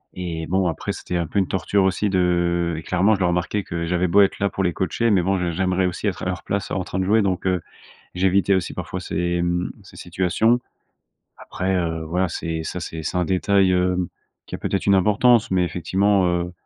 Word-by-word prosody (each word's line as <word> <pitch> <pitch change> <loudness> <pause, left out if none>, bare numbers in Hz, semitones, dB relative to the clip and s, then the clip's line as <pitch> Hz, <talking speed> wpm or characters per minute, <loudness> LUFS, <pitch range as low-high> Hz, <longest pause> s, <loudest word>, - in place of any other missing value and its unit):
et 85 -3 -4
bon, 95 0 +1
après, 80 - -3
c'était 90 - -4
un 85 - -1
peu 100 - -1
une 95 - +1
torture 95 +1 +1
aussi 95 +2 +1
de 85 -2 +1
et 80 - -6
clairement, 95 +5 +2
je - - -6
le 95 - +2
remarquais 90 +3 0
que 85 -1 -4
j'avais 90 +1 +1
beau 100 +4 +5
être 100 - +2
là 100 - +2
pour 95 - -4
les 90 - +1
coacher, 95 +7 -1
mais 100 -4 +4
bon, 95 +1 +1
j'ai 90 -1 -1
j'aimerais 95 +1 +1
aussi 90 +4 -5
être 95 -3 -2
à - - -3
leur 90 -2 -3
place 100 0 -2
en 95 - -1
train 95 - -4
de - - +1
jouer. 105 +4 +3
Donc 95 -2 -1
heu, 90 -2 +1 0.5
j'évitais 95 +2 +2
aussi 90 -4 -1
parfois - - -5
ces, 85 0 -1
mmh, 90 0 -1
ces - - -15
situations. 95 +7 +1 0.8
Après, 95 +1 -3
heu, 80 -2 -2
voilà, 90 +3 0
c'est 80 0 -4
ça 90 - -4
c'est 80 -1 -6
c'est 90 +3 -2
un 90 - 0
détail, 95 +1 +2
hem, 90 -1 +1 0.4
qui - - -8
a - - -4
peut - - -3
être 100 - -1
une 100 - +5
importance, 105 +4 +4
mais 90 -1 +2
effectivement, 95 +3 +1
heu, 90 0 -1
90 Hz, 230 wpm, -22 LUFS, 85-95 Hz, 0.8 s, beau